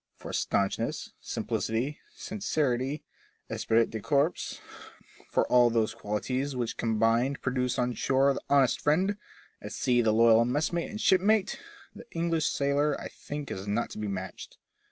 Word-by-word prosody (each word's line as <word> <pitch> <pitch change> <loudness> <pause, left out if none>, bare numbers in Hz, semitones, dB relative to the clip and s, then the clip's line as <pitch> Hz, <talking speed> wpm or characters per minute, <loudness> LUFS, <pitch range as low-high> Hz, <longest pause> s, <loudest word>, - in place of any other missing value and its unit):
For - - -9
staunchness, 100 -1 -1
simplicity, 120 +7 -2 0.2
sincerity, 150 - -1 0.5
esprit 115 0 +2
de 110 - -4
corps, 145 - 0 0.7
for - - +2
all 125 -1 +5
those 115 -1 +1
qualities 125 +5 -2
which 120 -2 -2
combined 115 +4 +1
produce 125 -1 0
on 125 0 0
shore 135 +3 +2
the - - -5
honest 140 -3 +3
friend, 185 +7 +2 0.5
at - - -7
sea 120 -1 +2
the 110 -2 +3
loyal 115 +1 +6
messmate 150 +7 -1
and 210 - -6
shipmate, 200 +1 +3 0.3
the - - -12
English 165 -2 0
sailor 140 +1 +1
I - - -6
think 145 -1 -7
is 95 +2 -5
not 110 +4 -1
to - - -7
be 105 - -3
matched. 95 -1 -6
130 Hz, 145 wpm, -29 LUFS, 115-150 Hz, 0.7 s, loyal